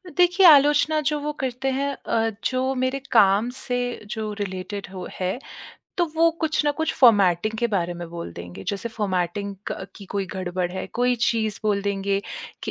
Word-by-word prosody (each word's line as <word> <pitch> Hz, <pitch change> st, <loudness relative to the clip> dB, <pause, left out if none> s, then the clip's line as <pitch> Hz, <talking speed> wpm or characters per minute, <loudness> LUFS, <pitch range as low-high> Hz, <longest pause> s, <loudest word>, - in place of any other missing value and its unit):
देखिए, 360 Hz, +1 st, +5 dB
आलोचना 295 Hz, +1 st, +6 dB
जो 300 Hz, -1 st, -1 dB
वो 300 Hz, +1 st, -2 dB
करते 260 Hz, +1 st, -2 dB
हैं 280 Hz, +2 st, -1 dB
अ, 225 Hz, -3 st, -1 dB
जो 260 Hz, +1 st, 0 dB
मेरे 255 Hz, +2 st, 0 dB
काम 210 Hz, +1 st, +5 dB
से 250 Hz, -1 st, -1 dB, 0.3 s
जो 215 Hz, -1 st, -3 dB
रिलेटेड 200 Hz, +1 st, -4 dB
हो 185 Hz, -, -6 dB
है। 185 Hz, +5 st, -1 dB, 0.6 s
तो 345 Hz, -, +4 dB
वो 330 Hz, +1 st, +4 dB
कुछ 310 Hz, -1 st, +1 dB
ना 295 Hz, -, +3 dB
कुछ 320 Hz, 0 st, 0 dB
फॉर्मेटिंग 210 Hz, -4 st, +4 dB
के 235 Hz, -, +2 dB
बारे 175 Hz, -2 st, 0 dB
में 175 Hz, -1 st, -7 dB
बोल 170 Hz, -, -6 dB
देंगे। 90 Hz, +2 st, -9 dB
जैसे 200 Hz, +4 st, -2 dB
फॉर्मेटिंग 200 Hz, -2 st, -2 dB, 0.2 s
क 190 Hz, -, -5 dB
की 200 Hz, -, -10 dB
कोई 200 Hz, -1 st, -1 dB
गड़बड़ 180 Hz, -1 st, -3 dB
है। 190 Hz, -, -4 dB
कोई 245 Hz, +1 st, +2 dB
चीज़ 220 Hz, -3 st, +1 dB
बोल 205 Hz, -2 st, +1 dB
देंगे 200 Hz, 0 st, 0 dB, 0.4 s
कि -, -, -3 dB
215 Hz, 180 wpm, -24 LUFS, 190-265 Hz, 0.6 s, आलोचना